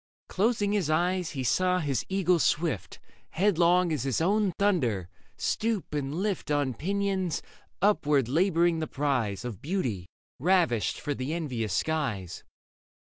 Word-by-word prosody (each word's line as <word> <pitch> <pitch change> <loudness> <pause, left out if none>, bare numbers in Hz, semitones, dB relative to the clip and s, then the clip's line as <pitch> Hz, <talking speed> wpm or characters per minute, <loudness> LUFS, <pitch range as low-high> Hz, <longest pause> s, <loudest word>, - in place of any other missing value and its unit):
Closing 205 0 +1
his 200 -7 0
eyes, 175 +2 +1
he 130 - -1
saw 180 +8 +2
his 140 -8 -1
eagle 185 -2 +2
swift. 150 - 0 0.3
Headlong 180 -2 +3
as 150 - -1
his 135 -2 0
own 200 +4 +2
thunder, 125 - +1 0.3
stoop 220 -7 -1
and 145 0 -2
lift 195 -2 -2
On 145 -3 +1
pinions 190 - -1 0.4
upward 150 - +3
labouring 170 +3 +2
the 155 - -2
prize 125 -8 -1
Of 115 -6 -6
beauty 130 - -2 0.3
ravished 160 - +2
for 145 - -2
the 135 +4 -3
envious 125 - -2
skies. 125 - -2
160 Hz, 135 wpm, -28 LUFS, 130-185 Hz, 0.4 s, Headlong